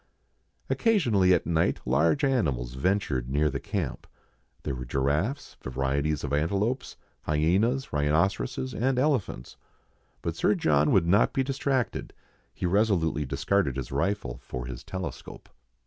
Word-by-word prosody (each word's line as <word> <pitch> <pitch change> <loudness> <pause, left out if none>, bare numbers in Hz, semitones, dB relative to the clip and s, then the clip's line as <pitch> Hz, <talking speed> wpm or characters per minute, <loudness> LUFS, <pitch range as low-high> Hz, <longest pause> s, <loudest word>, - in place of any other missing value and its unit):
Occasionally 120 - +3
at 90 - +3
night 85 0 +1
large 80 - +2
animals 70 - 0
ventured 70 -5 0
near 75 +2 +1
the 70 - -3
camp; 100 - -4 0.6
there - - -2
were 65 -1 -5
giraffes, 70 - -1
varieties 70 +3 -1
of 70 -1 -3
antelopes, 100 - -1 0.3
hyenas, 95 - +1
rhinoceroses, 85 - 0
and 130 +2 0
elephants. 125 - -1 0.7
But - - -2
Sir - - +2
John 75 -1 +2
would 90 -4 +4
not 100 +5 +3
be 135 - +1
distracted, 135 -1 -1 0.4
he - - -5
resolutely 90 -6 +2
discarded 75 +1 0
his 65 - -5
rifle 70 -4 -1
for 60 -1 -6
his - - -7
telescope. 95 -3 -7
85 Hz, 130 wpm, -27 LUFS, 70-110 Hz, 0.7 s, would